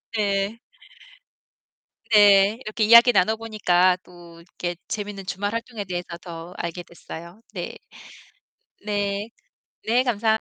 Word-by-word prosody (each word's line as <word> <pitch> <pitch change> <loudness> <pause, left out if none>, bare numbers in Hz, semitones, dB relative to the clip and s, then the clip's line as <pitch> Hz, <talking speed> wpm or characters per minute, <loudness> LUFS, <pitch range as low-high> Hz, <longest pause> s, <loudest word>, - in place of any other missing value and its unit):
네. 200 +1 -1 1.5
네, 205 +1 +6
이렇게 215 +1 -2
이야기 235 +3 +8
나눠보니까 195 -4 +2
또 170 -1 -15
이렇게 175 +1 -6
재밌는 205 -2 -5
주말 205 +3 -3
활동에 230 -2 -4
대해서 175 -2 -5
더 170 0 -9
알게 170 +1 -5
됐어요. 170 +3 -11
네. - - -5 1.1
네. 205 0 -2 0.6
네 245 +3 +3
감사합 220 -3 +1
200 Hz, 230 characters per minute, -23 LUFS, 180-220 Hz, 1.5 s, 이야기